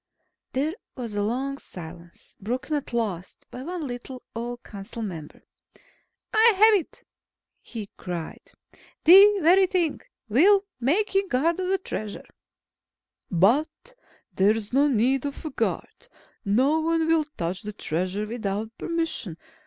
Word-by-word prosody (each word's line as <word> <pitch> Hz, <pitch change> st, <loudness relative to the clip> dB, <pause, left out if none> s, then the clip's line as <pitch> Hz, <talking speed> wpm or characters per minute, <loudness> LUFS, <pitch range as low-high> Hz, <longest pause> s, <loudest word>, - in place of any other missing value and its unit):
There 290 Hz, +5 st, 0 dB, 0.2 s
was 235 Hz, -4 st, -5 dB
a 205 Hz, -, -1 dB
long 265 Hz, +6 st, -2 dB
silence, 170 Hz, 0 st, -11 dB
broken 255 Hz, +8 st, -3 dB
at 285 Hz, -, -3 dB
last 205 Hz, -7 st, -3 dB
by 250 Hz, -, -7 dB
one 340 Hz, +2 st, -5 dB
little, 250 Hz, 0 st, -7 dB
old 240 Hz, +1 st, -5 dB
council 210 Hz, +3 st, -8 dB
member. 165 Hz, -7 st, -7 dB, 0.9 s
"I 445 Hz, +1 st, +6 dB
have 435 Hz, +3 st, +7 dB
it," -, -, -17 dB, 0.6 s
he 220 Hz, -4 st, -7 dB
cried. 175 Hz, -3 st, -7 dB, 0.5 s
"The 395 Hz, +5 st, +8 dB
very 370 Hz, +4 st, +6 dB
thing. 350 Hz, -5 st, 0 dB, 0.3 s
We'll 390 Hz, -, +5 dB
make 350 Hz, -, +1 dB
him 390 Hz, 0 st, +2 dB
guard 325 Hz, +4 st, +1 dB
of 370 Hz, -, -1 dB
the 385 Hz, +1 st, +2 dB
Treasure." 215 Hz, -, -6 dB, 1.0 s
"But 245 Hz, -, +1 dB, 0.4 s
there's 210 Hz, +3 st, +1 dB
no 280 Hz, +3 st, +4 dB
need 260 Hz, +1 st, +2 dB
of 285 Hz, +2 st, -6 dB
a 310 Hz, -, -3 dB
guard. -, -, -3 dB, 0.4 s
No 255 Hz, +9 st, +2 dB
one 325 Hz, 0 st, +1 dB
will 325 Hz, -1 st, +2 dB
touch 175 Hz, +2 st, -3 dB
the 210 Hz, -, -6 dB
Treasure 185 Hz, +3 st, -2 dB
without 220 Hz, 0 st, -4 dB
permission. 325 Hz, -, -2 dB
250 Hz, 135 wpm, -25 LUFS, 205-325 Hz, 1.0 s, The